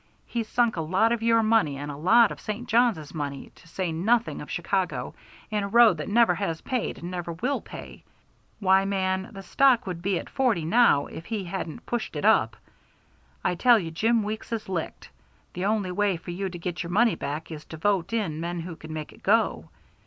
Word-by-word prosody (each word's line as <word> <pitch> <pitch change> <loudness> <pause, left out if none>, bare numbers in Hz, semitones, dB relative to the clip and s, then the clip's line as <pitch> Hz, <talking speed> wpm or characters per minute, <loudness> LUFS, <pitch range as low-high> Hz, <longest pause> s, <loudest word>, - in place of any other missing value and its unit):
He's 230 -2 -3
sunk 235 -5 +1
a - - 0
lot 190 +8 +2
of 235 -1 0
your 230 0 +3
money 215 -11 +2
and 145 +1 -5
a - - -7
lot 220 +9 +5
of - - -8
St. 220 +3 -5
Johns's 225 -11 +2
money, 145 -3 -5
to - - -20
say 180 0 -3
nothing 220 +9 +1
of - - -9
Chicago, - - -2 0.4
in 210 -1 0
a 200 - -2
road 230 -3 +6
that 155 - -5
never 230 +2 +4
has 165 -5 -3
paid 255 -4 -2
and 175 +2 -7
never 175 -2 -4
will 250 +12 -2
pay. - - -10 0.6
Why, 190 -1 +4
man, 190 0 -1
the 195 -3 -9
stock 255 +2 +3
would 180 -3 -5
be 190 0 0
at - - -6
forty 235 - 0
now 200 -5 +4
if 165 - -10
we 215 -4 -2
hadn't 180 +2 -6
pushed 240 -8 -3
it 145 - -2
up. 110 0 +3 0.9
I 180 - +1
tell 240 +7 +5
you 170 -6 -4
Jim 225 +7 +2
Weeks 215 +2 -5
is 225 -2 -3
licked. 180 -4 -5 0.4
The 180 +2 -3
only 205 -3 0
way 200 -1 +1
for 175 - -8
you 190 +2 -3
to 175 - -8
get 175 +1 -4
your 170 - -5
money 225 +5 +3
back 145 +4 -5
is 155 -1 -7
to 160 - -9
vote 195 +1 0
in 195 -9 -1
men 170 +1 -3
who 170 0 -7
can 155 - -10
make 155 -1 -6
it - - -19
go. - - +1
190 Hz, 215 wpm, -26 LUFS, 165-225 Hz, 0.9 s, road